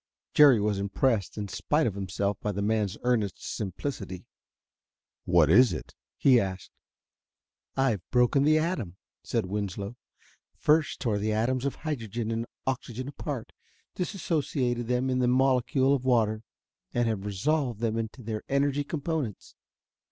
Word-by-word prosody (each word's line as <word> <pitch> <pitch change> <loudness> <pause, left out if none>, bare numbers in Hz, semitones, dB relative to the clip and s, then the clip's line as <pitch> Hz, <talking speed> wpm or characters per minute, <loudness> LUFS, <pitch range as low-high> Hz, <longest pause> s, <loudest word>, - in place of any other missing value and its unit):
Jerry 140 -6 +7
was 105 -1 0
impressed 100 +1 0
in 105 -1 -3
spite 150 +10 0
of 110 - 0
himself 100 +1 -2
by 105 - -1
the 100 0 -2
man's 105 -2 0
earnest 115 -6 +1
simplicity. 95 -2 -5 1.0
"What 85 -3 +5
is 120 - +6
it?" - - -7 0.2
he 130 -3 +5
asked. 95 -3 -4 1.1
"I've 130 -8 +2
broken 125 +3 +3
the 155 +2 +5
atom," 155 - -2 0.3
said - - -1
Winslow. 100 +2 -4 0.6
"First 150 0 +2
tore 110 -6 0
the 110 +1 0
atoms 125 +4 0
of 140 - -1
hydrogen 115 -7 -3
and 115 +1 -2 0.2
oxygen 130 -1 -3
apart 140 -3 -5 0.4
dissociated 145 - -1
them 125 +2 +1
in 130 - +1
the 125 - +2
molecule 130 +1 +3
of 135 -3 0
water 110 -4 +2 0.5
and 120 -1 +2
have 110 -4 -1
resolved 120 +4 0
them 115 -1 0
into 115 +3 -5
their 110 -1 -3
energy 140 +1 +1
components. 145 - -3
120 Hz, 140 wpm, -28 LUFS, 105-135 Hz, 1.1 s, Jerry